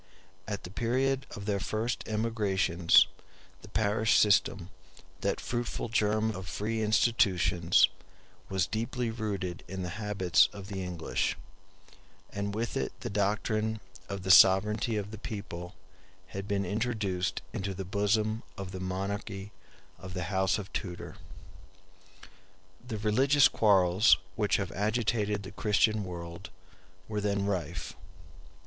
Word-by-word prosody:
At 105 Hz, -2 st, -4 dB
the 90 Hz, -, -8 dB
period 130 Hz, +5 st, 0 dB
of 100 Hz, -2 st, -8 dB
their 100 Hz, -1 st, 0 dB
first 110 Hz, +4 st, -2 dB
emigrations 105 Hz, -6 st, +3 dB, 0.6 s
the -, -, -12 dB
parish 110 Hz, +1 st, +2 dB
system, 100 Hz, -2 st, +3 dB, 0.5 s
that 100 Hz, -, -1 dB
fruitful 120 Hz, -1 st, -3 dB
germ 110 Hz, 0 st, +1 dB
of 95 Hz, -3 st, -7 dB
free 110 Hz, +3 st, -2 dB
institutions, 95 Hz, -6 st, +3 dB, 0.6 s
was 95 Hz, -3 st, +1 dB
deeply 115 Hz, +2 st, -2 dB
rooted 100 Hz, -6 st, -4 dB
in 95 Hz, 0 st, -5 dB
the 90 Hz, +4 st, -5 dB
habits 100 Hz, -5 st, +3 dB
of 100 Hz, -1 st, -9 dB
the 95 Hz, -2 st, -4 dB
English; 90 Hz, -3 st, -2 dB, 0.9 s
and 100 Hz, 0 st, -3 dB
with 115 Hz, +2 st, -2 dB
it -, -, -3 dB
the -, -, -4 dB
doctrine 110 Hz, +2 st, 0 dB, 0.3 s
of 100 Hz, -2 st, -5 dB
the 95 Hz, -, +2 dB
sovereignty 105 Hz, +4 st, +6 dB
of 105 Hz, 0 st, -4 dB
the 110 Hz, -, -8 dB
people 95 Hz, -5 st, -6 dB, 0.5 s
had 95 Hz, 0 st, -6 dB
been 100 Hz, -1 st, 0 dB
introduced 100 Hz, -3 st, -1 dB
into 100 Hz, -3 st, -3 dB
the 95 Hz, 0 st, -5 dB
bosom 105 Hz, +3 st, +1 dB, 0.2 s
of 95 Hz, -2 st, -6 dB
the 95 Hz, -, -6 dB
monarchy 100 Hz, +2 st, -4 dB, 0.5 s
of 95 Hz, +1 st, -9 dB
the 90 Hz, -, -2 dB
House 95 Hz, +2 st, +2 dB
of 100 Hz, -2 st, -8 dB
Tudor. 90 Hz, -3 st, -5 dB, 1.7 s
The 110 Hz, -3 st, -3 dB
religious 130 Hz, +7 st, +4 dB
quarrels 100 Hz, -2 st, +4 dB, 0.2 s
which 105 Hz, -2 st, +2 dB
have 100 Hz, -2 st, -3 dB
agitated 105 Hz, -1 st, 0 dB
the 95 Hz, -, -8 dB
Christian 105 Hz, 0 st, +2 dB
world 85 Hz, 0 st, -7 dB, 0.6 s
were 105 Hz, -1 st, -2 dB
then 100 Hz, -1 st, 0 dB
rife. 90 Hz, -5 st, -3 dB
100 Hz, 130 wpm, -30 LUFS, 95-110 Hz, 1.7 s, sovereignty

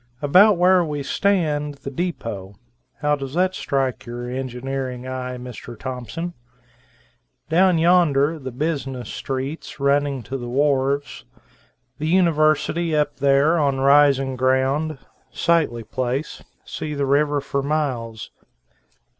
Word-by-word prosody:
About 185 Hz, +8 st, +5 dB
where 180 Hz, +1 st, +5 dB
we 150 Hz, -3 st, -3 dB
stand, 150 Hz, -4 st, 0 dB
the 135 Hz, 0 st, -8 dB
deepo. 115 Hz, -, -4 dB, 0.5 s
How 150 Hz, 0 st, +2 dB
does 135 Hz, 0 st, -7 dB
that 185 Hz, +1 st, +2 dB
strike 135 Hz, -8 st, -1 dB
your 120 Hz, +1 st, -6 dB
engineering 130 Hz, 0 st, -4 dB
eye, 125 Hz, -1 st, -4 dB
Mr. 120 Hz, -1 st, -9 dB
Thompson? 130 Hz, +8 st, -5 dB, 1.2 s
Down 180 Hz, +2 st, +4 dB
yonder 160 Hz, -3 st, +3 dB
the 130 Hz, -2 st, -6 dB
business 135 Hz, -3 st, -3 dB
streets, 135 Hz, +4 st, -5 dB
running 140 Hz, -1 st, +1 dB
to 130 Hz, +6 st, -5 dB
the 120 Hz, -1 st, -6 dB
wharves. 140 Hz, +1 st, 0 dB, 0.8 s
The 155 Hz, -, -2 dB
University 160 Hz, -1 st, +2 dB
up 150 Hz, -1 st, 0 dB
there, 140 Hz, +4 st, +3 dB
on 140 Hz, -3 st, +1 dB
rising 135 Hz, -1 st, +4 dB
ground, 135 Hz, +4 st, +1 dB, 0.3 s
sightly 160 Hz, -9 st, +1 dB
place, 130 Hz, +5 st, -3 dB, 0.2 s
see 150 Hz, -1 st, -5 dB
the 140 Hz, -1 st, 0 dB
river 145 Hz, +1 st, +2 dB
for 140 Hz, 0 st, -2 dB
miles. 130 Hz, -7 st, -3 dB
140 Hz, 120 wpm, -22 LUFS, 130-155 Hz, 1.2 s, About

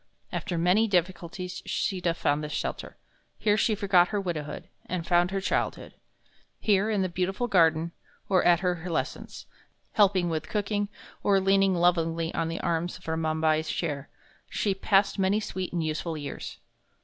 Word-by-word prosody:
After 180 Hz, -5 st, -3 dB
many 180 Hz, +7 st, +3 dB
difficulties, 180 Hz, -1 st, -2 dB
Sita 180 Hz, -4 st, 0 dB
found 145 Hz, -2 st, 0 dB
this 150 Hz, -, -5 dB
shelter. -, -, -4 dB, 0.4 s
Here 210 Hz, -1 st, +2 dB
she 215 Hz, 0 st, +2 dB
forgot 190 Hz, -3 st, +4 dB
her 205 Hz, +1 st, -1 dB
widowhood, 165 Hz, -6 st, -4 dB, 0.2 s
and 175 Hz, -2 st, -3 dB
found 175 Hz, 0 st, +3 dB
her 195 Hz, 0 st, -1 dB
childhood. 190 Hz, -, -2 dB, 0.7 s
Here, 205 Hz, 0 st, +2 dB
in 205 Hz, -3 st, +1 dB
the -, -, +1 dB
beautiful 185 Hz, +6 st, -1 dB
garden, 165 Hz, -4 st, +3 dB, 0.4 s
or 185 Hz, -2 st, +3 dB
at 175 Hz, -1 st, +4 dB
her 180 Hz, -3 st, -1 dB
lessons, 160 Hz, -, -4 dB, 0.5 s
helping 195 Hz, -4 st, +3 dB
with 160 Hz, -2 st, -3 dB
cooking, 205 Hz, -1 st, -1 dB, 0.3 s
or 200 Hz, -1 st, +3 dB
leaning 195 Hz, 0 st, +3 dB
lovingly 165 Hz, -1 st, +1 dB
on 165 Hz, -, -1 dB
the 165 Hz, 0 st, -3 dB
arms 170 Hz, 0 st, -1 dB
of 185 Hz, -, -17 dB
Ramabai's 160 Hz, -1 st, +1 dB
chair, 145 Hz, -4 st, -3 dB, 0.4 s
she 200 Hz, -, 0 dB
passed 195 Hz, +1 st, +2 dB
many 195 Hz, +2 st, +3 dB
sweet 185 Hz, -3 st, -4 dB
and 170 Hz, -2 st, -1 dB
useful 155 Hz, +1 st, -2 dB
years. 145 Hz, -1 st, -6 dB
180 Hz, 155 wpm, -27 LUFS, 165-195 Hz, 0.7 s, forgot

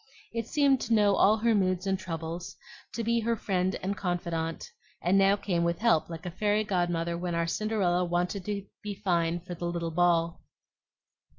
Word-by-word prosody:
It 230 Hz, -1 st, -3 dB
seemed 280 Hz, -2 st, +3 dB
to 230 Hz, -, +1 dB
know 205 Hz, -2 st, +4 dB
all 215 Hz, +2 st, +5 dB
her 230 Hz, +1 st, +2 dB
moods 185 Hz, -2 st, +1 dB
and 190 Hz, -1 st, 0 dB
troubles, 165 Hz, -1 st, -5 dB, 0.4 s
to 230 Hz, -, -2 dB
be 235 Hz, +1 st, +2 dB
her 230 Hz, +1 st, 0 dB
friend 190 Hz, -3 st, 0 dB
and 195 Hz, +2 st, -1 dB
confidante, 170 Hz, -3 st, -3 dB, 0.3 s
and 180 Hz, +3 st, +1 dB
now 195 Hz, 0 st, +5 dB
came 180 Hz, -4 st, -1 dB
with 170 Hz, 0 st, 0 dB
help 220 Hz, -9 st, +2 dB
like 165 Hz, +1 st, -7 dB
a 175 Hz, -, -3 dB
fairy 210 Hz, +3 st, +1 dB
godmother 175 Hz, -4 st, 0 dB
when 175 Hz, 0 st, -3 dB
our 170 Hz, 0 st, +1 dB
Cinderella 185 Hz, -1 st, 0 dB
wanted 180 Hz, +2 st, -1 dB
to 200 Hz, -2 st, -3 dB, 0.2 s
be 205 Hz, -1 st, -5 dB
fine 175 Hz, -4 st, 0 dB
for 180 Hz, +1 st, -7 dB
the 175 Hz, 0 st, -5 dB
little 170 Hz, -1 st, -2 dB
ball. 170 Hz, 0 st, +2 dB
180 Hz, 185 wpm, -29 LUFS, 170-205 Hz, 0.4 s, all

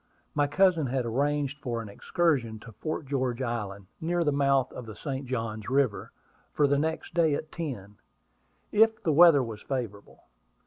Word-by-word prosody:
My 145 Hz, -1 st, +2 dB
cousin 175 Hz, -2 st, +3 dB
had 130 Hz, 0 st, -1 dB
arranged 145 Hz, +4 st, 0 dB
for 120 Hz, -5 st, -3 dB
an 115 Hz, -, -6 dB
excursion 125 Hz, 0 st, 0 dB
to 115 Hz, -, -11 dB
Fort 155 Hz, +6 st, -4 dB
George 130 Hz, -3 st, -1 dB
Island, 105 Hz, -5 st, -4 dB, 0.2 s
near 170 Hz, +1 st, +1 dB
the 150 Hz, -, +2 dB
mouth 140 Hz, -2 st, +2 dB
of 125 Hz, -, -8 dB
the 110 Hz, -, -8 dB
St. 135 Hz, +2 st, -5 dB
Johns 115 Hz, -3 st, -3 dB
River, 130 Hz, -4 st, +1 dB, 0.4 s
for 150 Hz, -, +3 dB
the 140 Hz, 0 st, +2 dB
next 160 Hz, +2 st, -2 dB
day 160 Hz, -4 st, +3 dB
at 155 Hz, +1 st, -6 dB
ten, 105 Hz, -, -6 dB, 0.7 s
if 220 Hz, +1 st, +4 dB
the 160 Hz, -, +2 dB
weather 160 Hz, -3 st, +7 dB
was 110 Hz, -3 st, -7 dB
favorable. 115 Hz, -7 st, -5 dB
135 Hz, 170 wpm, -28 LUFS, 115-155 Hz, 0.7 s, weather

